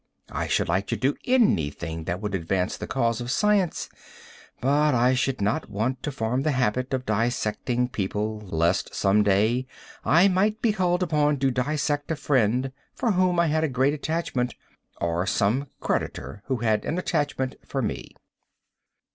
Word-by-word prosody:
I - - -2
should - - +1
like 95 +4 0
to 115 - -1
do 130 +7 +1
anything 80 - +1
that 90 +2 -2
would 105 -1 -4
advance 90 +1 -1
the - - -6
cause 115 -3 0
of 120 - -5
science, 205 +3 +1 0.7
but 145 +2 +3
I 125 +2 +4
should 130 -2 0
not 105 +2 0
want 115 +6 -2
to 150 - -3
form 125 0 -1
the 150 +1 +1
habit 125 0 0
of 130 -1 -2
dissecting 120 +2 0
people, 105 +1 -2
lest 85 -2 0
some 100 +1 +3
day 110 +6 +2 0.4
I 170 +5 +5
might 200 +3 +2
be 220 -2 +2
called 180 -2 +1
upon 150 -3 +2
to 135 0 +1
dissect 145 +3 -1
a 160 - 0
friend 130 -3 +1 0.2
for 235 - +1
whom 185 -2 +2
I 170 - +4
had 155 0 +1
a 160 - +1
great 135 +2 +2
attachment, 150 -5 -2 0.4
or 85 +2 -1
some 115 +8 +1
creditor 70 +11 -3
who 130 - +1
had 110 -2 +1
an 165 - -2
attachment 145 -7 -1
for 135 -2 -2
me. - - -4
130 Hz, 165 wpm, -25 LUFS, 105-150 Hz, 0.7 s, I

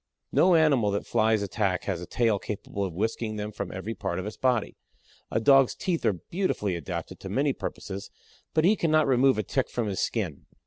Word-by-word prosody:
No 180 -1 +5
animal 140 -9 +4
that 100 0 -2
Flies 110 -2 +2
attack 95 -1 -1
has 90 -4 -2
a 90 - -7
tail 115 -4 +1
capable 100 0 -4
of 90 -4 -4
whisking 110 +2 -2
them 105 0 -4
from 100 -3 -5
every 95 +5 -4
part 95 -5 -3
of 95 - -3
its 105 - -5
body. 125 -4 0 0.5
A - - 0
Dog's 135 +2 +5
teeth 175 -3 -2
are - - +3 0.2
beautifully 165 - 0
adapted 85 -5 -5
to - - -7
many - - +1
purposes, 100 +1 -6 0.5
but 155 0 +4
he 205 +4 +5
cannot 155 -4 +3
remove 130 -1 +4
a 110 - 0
Tick 135 +4 -1
from 120 - -2
his 100 -3 -2
skin. - - -2
110 Hz, 205 wpm, -27 LUFS, 100-135 Hz, 0.5 s, No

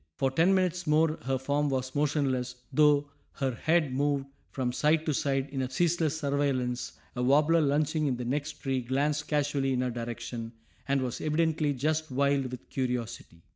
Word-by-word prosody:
For 135 +10 0
ten 170 +8 +4
minutes 180 -2 0
more 155 +1 +3
her 135 0 +1
form 145 +3 0
was 130 -1 -2
motionless 140 -4 0 0.2
though 145 0 +4 0.2
her 135 -3 -1
head 155 +2 +1
moved 140 0 0 0.2
from 130 -2 -2
side 155 +4 +2
to 155 - +1
side 135 0 0
in 135 -2 -2
a 130 - -2
ceaseless 160 +1 +1
surveillance 140 -4 -1 0.2
a 125 - -2
warbler 150 +6 +4
lunching 150 +1 +1
in 130 -3 0
the 125 - -4
next 145 +4 -2
tree 135 -3 -2
glanced 145 +4 -1
casually 145 -2 0
in 125 - 0
her 125 -1 -1
direction, 115 0 -5 0.3
and 135 -1 +1
was 125 -2 -4
evidently 155 -1 +1
just 155 +4 -1
wild 140 0 +1
with 125 - -8
curiosity. 120 -9 -4
140 Hz, 175 wpm, -29 LUFS, 130-150 Hz, 0.3 s, ten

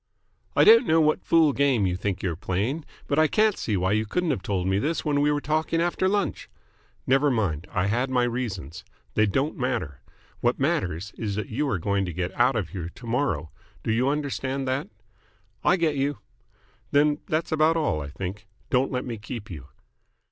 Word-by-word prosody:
"I - - +6
don't 450 +2 +7
know 160 - +4
what 155 -1 +2
fool 160 -3 +4
game 135 -7 +2
you 90 -1 0
think 100 +1 -3
you're 90 -4 -1
playing, 110 - -2 0.2
but 145 - +1
I 155 - +5
can't 215 +4 +3
see 105 -3 -1
why 95 +1 +1
you 110 +1 +1
couldn't 175 +7 0
have 125 - -2
told 95 -1 -2
me 95 +1 +1
this 160 +8 -1
when 145 -1 +2
we 145 +1 +3
were 145 - +1
talking 155 +2 0
after 175 +2 +1
lunch." 200 0 -1 0.6
"Never 135 +3 +3
mind. 95 - -1
I 90 - 0
had 120 +6 0
my 125 -1 +2
reasons. 110 - -3 0.3
They 110 0 +3
don't 135 +10 0
matter. 115 - -2 0.4
What 120 +1 +1
matters 100 - -1
is 105 -3 -2
that 110 - -4
you 140 +6 -1
are 100 - 0
going 100 +3 0
to 90 - -5
get 90 +2 -3
out 125 +2 +3
of 105 -6 -1
here 85 -4 -5
to 120 - -13
morrow. 115 - -1 0.3
Do - - 0
you 120 +4 +2
understand 140 -2 -2
that?" 130 -3 -1 0.7
"I 180 - +5
get 160 -5 0
you." 140 +1 0 0.7
"Then 145 +1 +3
that's 155 +1 -1
about 155 +1 +3
all, 150 - 0
I 70 - -5
think. 95 +6 -6 0.2
Don't 130 +1 +2
let 125 -1 -2
me 115 -4 -5
keep 105 0 -7
you." 75 -6 -8
125 Hz, 200 wpm, -25 LUFS, 100-150 Hz, 0.7 s, don't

